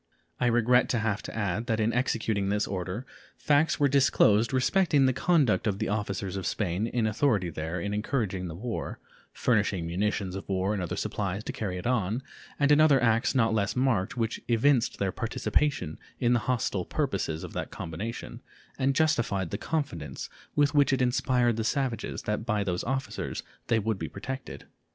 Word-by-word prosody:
I 125 Hz, -, +2 dB
regret 120 Hz, +1 st, +4 dB
to 120 Hz, -, +1 dB
have 105 Hz, -2 st, 0 dB
to -, -, -8 dB
add 105 Hz, +2 st, -1 dB
that 110 Hz, -2 st, 0 dB
in 110 Hz, +1 st, +1 dB
executing 110 Hz, -5 st, 0 dB
this 105 Hz, +1 st, +1 dB
order 95 Hz, +5 st, -4 dB, 0.3 s
facts 150 Hz, +2 st, +2 dB
were 145 Hz, -, +5 dB
disclosed 120 Hz, -5 st, +4 dB
respecting 145 Hz, +2 st, +3 dB
the 130 Hz, -, +3 dB
conduct 145 Hz, -7 st, +2 dB
of 100 Hz, -2 st, 0 dB
the -, -, -2 dB
officers 100 Hz, -2 st, -2 dB
of 95 Hz, -3 st, -3 dB
Spain 100 Hz, +1 st, -1 dB
in 120 Hz, -1 st, 0 dB
authority 110 Hz, -5 st, +1 dB
there 80 Hz, +3 st, -4 dB
in 100 Hz, +4 st, -3 dB
encouraging 105 Hz, -4 st, -1 dB
the 80 Hz, -, -6 dB
war, 115 Hz, +5 st, -4 dB, 0.3 s
furnishing 105 Hz, -7 st, +1 dB
munitions 95 Hz, +2 st, -1 dB
of 95 Hz, -, -7 dB
war 95 Hz, +1 st, 0 dB
and 100 Hz, -, -2 dB
other 90 Hz, -, -3 dB
supplies 100 Hz, 0 st, -2 dB
to -, -, -5 dB
carry 95 Hz, -4 st, -3 dB
it 90 Hz, -, -7 dB
on, 120 Hz, 0 st, 0 dB, 0.4 s
and 145 Hz, 0 st, +3 dB
in 150 Hz, +1 st, +6 dB
other 145 Hz, -4 st, +6 dB
acts 115 Hz, +2 st, +2 dB
not 115 Hz, -3 st, +3 dB
less 100 Hz, -3 st, 0 dB
marked 125 Hz, -3 st, +1 dB
which 115 Hz, -1 st, -1 dB
evinced 120 Hz, +1 st, +3 dB
their 95 Hz, -1 st, 0 dB
participation 110 Hz, -, -1 dB, 0.2 s
in 120 Hz, 0 st, +3 dB
the 120 Hz, -, +3 dB
hostile 115 Hz, -6 st, 0 dB
purposes 100 Hz, -, -2 dB
of -, -, -8 dB
that -, -, -3 dB
combination 100 Hz, +9 st, -6 dB, 0.4 s
and 135 Hz, +1 st, +2 dB
justified 120 Hz, -, +1 dB
the -, -, -2 dB
confidence 85 Hz, -, -3 dB, 0.2 s
with 145 Hz, 0 st, +3 dB
which 145 Hz, -1 st, +4 dB
it 135 Hz, -1 st, +1 dB
inspired 125 Hz, -2 st, +2 dB
the 110 Hz, -, 0 dB
savages 125 Hz, -1 st, -2 dB
that 105 Hz, +1 st, -2 dB
by 105 Hz, -3 st, 0 dB
those 90 Hz, -3 st, -2 dB
officers 135 Hz, +1 st, -3 dB, 0.2 s
they 115 Hz, -, +3 dB
would 110 Hz, -2 st, -1 dB
be -, -, -4 dB
protected. 130 Hz, +7 st, -7 dB
110 Hz, 185 wpm, -28 LUFS, 100-130 Hz, 0.4 s, in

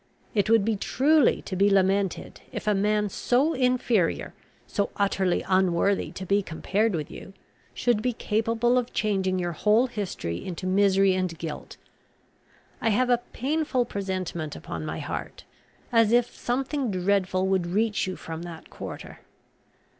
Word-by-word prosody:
It 210 Hz, 0 st, +1 dB
would 225 Hz, -3 st, +4 dB
be 225 Hz, -1 st, +1 dB
truly 285 Hz, +7 st, +3 dB
to 190 Hz, -, -5 dB
be 200 Hz, +2 st, +4 dB
lamented, 195 Hz, -1 st, +1 dB
if -, -, -6 dB
a 210 Hz, -, +3 dB
man 210 Hz, +1 st, +1 dB
so 255 Hz, -, +1 dB
inferior, 250 Hz, -7 st, +1 dB, 0.3 s
so 200 Hz, -, -1 dB
utterly 195 Hz, -3 st, +1 dB
unworthy 190 Hz, +1 st, +2 dB
to 190 Hz, -, -6 dB
be 200 Hz, +2 st, +2 dB
compared 200 Hz, +4 st, -1 dB
with 150 Hz, -3 st, -4 dB
you, 195 Hz, -, -10 dB, 0.4 s
should 240 Hz, -4 st, +1 dB
be 250 Hz, -, +1 dB
capable 230 Hz, +2 st, +1 dB
of 245 Hz, 0 st, -5 dB
changing 190 Hz, -3 st, 0 dB
your 175 Hz, -1 st, -1 dB
whole 210 Hz, +8 st, +3 dB
history 195 Hz, -, -4 dB
into 185 Hz, 0 st, -6 dB
misery 195 Hz, 0 st, +4 dB
and 185 Hz, -3 st, -2 dB
guilt. 160 Hz, -3 st, -7 dB, 1.0 s
I 225 Hz, -, +2 dB
have 245 Hz, +4 st, +2 dB
a 240 Hz, -, +4 dB
painful 275 Hz, -1 st, 0 dB
presentiment 185 Hz, -7 st, -4 dB
upon -, -, -6 dB
my -, -, -4 dB
heart, -, -, -6 dB, 0.5 s
as 230 Hz, -2 st, +4 dB
if 240 Hz, 0 st, +2 dB
something 265 Hz, +1 st, -1 dB
dreadful 185 Hz, -1 st, +1 dB
would 190 Hz, -2 st, +1 dB
reach 210 Hz, +3 st, 0 dB
you 185 Hz, -, -3 dB
from 165 Hz, 0 st, -7 dB
that 170 Hz, -2 st, -9 dB
quarter. -, -, -8 dB
200 Hz, 150 wpm, -26 LUFS, 185-230 Hz, 1.0 s, would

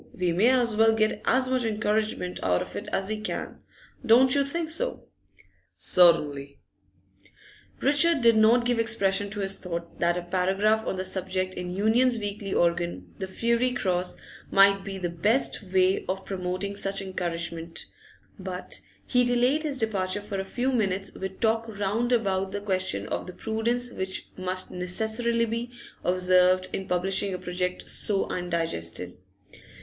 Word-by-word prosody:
We 180 Hz, -1 st, 0 dB
may 195 Hz, +8 st, +4 dB
as 245 Hz, -4 st, +2 dB
well 225 Hz, +1 st, +5 dB
get 215 Hz, -1 st, +1 dB
as 260 Hz, 0 st, +3 dB
much 255 Hz, -1 st, 0 dB
encouragement 215 Hz, -4 st, -1 dB
out 90 Hz, -1 st, +1 dB
of -, -, -12 dB
it 205 Hz, -, -5 dB
as 190 Hz, -, -1 dB
we 215 Hz, 0 st, -2 dB
can. 215 Hz, -, -5 dB, 0.4 s
Don't 255 Hz, +2 st, +6 dB
you 280 Hz, -, +3 dB
think 320 Hz, +3 st, -3 dB
so?' -, -, -2 dB, 0.7 s
'Certainly.' 145 Hz, -6 st, +3 dB, 1.2 s
Richard 290 Hz, +2 st, +3 dB
did 230 Hz, -1 st, +5 dB
not 225 Hz, +3 st, +5 dB
give 245 Hz, -1 st, +1 dB
expression 205 Hz, -3 st, +1 dB
to 205 Hz, 0 st, -4 dB
his 195 Hz, 0 st, -1 dB
thought 170 Hz, -2 st, -6 dB
that 170 Hz, 0 st, +2 dB
a 175 Hz, -, -3 dB
paragraph 190 Hz, +5 st, +1 dB
on -, -, -1 dB
the 185 Hz, 0 st, -3 dB
subject 185 Hz, 0 st, -2 dB
in 180 Hz, -1 st, -5 dB
the 180 Hz, -, -5 dB
Union's 235 Hz, +5 st, +3 dB
weekly 205 Hz, -2 st, -4 dB
organ, 170 Hz, 0 st, 0 dB
the 190 Hz, -, -3 dB
'Fiery 235 Hz, +5 st, +1 dB
Cross,' 185 Hz, -5 st, -1 dB, 0.3 s
might 195 Hz, 0 st, +5 dB
be 195 Hz, 0 st, -5 dB
the 185 Hz, -, -4 dB
best 205 Hz, +10 st, 0 dB
way 185 Hz, -1 st, +2 dB
of 190 Hz, +1 st, -3 dB
promoting 185 Hz, +1 st, -3 dB
such 195 Hz, 0 st, -2 dB
encouragement; 170 Hz, -3 st, -4 dB, 0.5 s
but 185 Hz, -1 st, -6 dB, 0.2 s
he 250 Hz, -1 st, +3 dB
delayed 245 Hz, +5 st, +2 dB
his 295 Hz, -3 st, -2 dB
departure 205 Hz, -4 st, 0 dB
for 205 Hz, -1 st, -5 dB
a -, -, -1 dB
few 245 Hz, +7 st, -1 dB
minutes 195 Hz, -5 st, -1 dB
with 190 Hz, 0 st, -6 dB
talk 225 Hz, 0 st, +1 dB
round 220 Hz, +5 st, 0 dB
about 195 Hz, -5 st, +1 dB
the 205 Hz, -, -3 dB
question 190 Hz, -2 st, 0 dB
of -, -, -3 dB
the 180 Hz, -, -7 dB
prudence 235 Hz, +4 st, -1 dB
which 190 Hz, -2 st, -4 dB
must 185 Hz, 0 st, -4 dB
necessarily 220 Hz, +6 st, -1 dB
be 230 Hz, +2 st, -3 dB, 0.3 s
observed 185 Hz, 0 st, +3 dB
in 190 Hz, -, -3 dB
publishing 190 Hz, +2 st, 0 dB
a -, -, -3 dB
project 180 Hz, 0 st, -3 dB
so 200 Hz, -2 st, 0 dB
undigested. 165 Hz, -, -3 dB
195 Hz, 160 wpm, -26 LUFS, 185-230 Hz, 1.2 s, Don't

